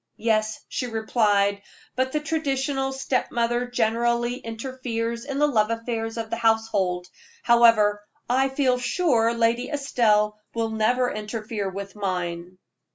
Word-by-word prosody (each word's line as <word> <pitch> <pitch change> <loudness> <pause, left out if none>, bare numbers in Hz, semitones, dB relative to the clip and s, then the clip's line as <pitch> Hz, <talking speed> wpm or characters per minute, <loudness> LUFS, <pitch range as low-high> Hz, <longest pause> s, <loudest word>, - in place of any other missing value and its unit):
"Yes," 215 -1 0
she 250 - -3
replied: 210 -3 +1 0.3
"but 260 +1 0
the 300 - 0
traditional 275 -3 -1
step 265 -1 -1
mother 240 +1 0
generally 240 +1 0
interferes 235 -1 -4
in 275 -1 -4
the 295 - +4
love 220 -7 +2
affairs 230 0 -3
of 225 -1 -4
the 230 - -1
household. 220 -6 +1 0.4
However, 230 -3 +5 0.3
I 265 +2 +2
feel 265 -2 +1
quite 250 - -7
sure 240 -8 +2
Lady 230 +2 +1
Estelle 215 -7 +1 0.2
will 225 -1 -1
never 245 +3 +1
interfere 215 -1 -4
with 200 +1 -7
mine." 180 -2 -3
230 Hz, 135 wpm, -24 LUFS, 215-250 Hz, 0.4 s, However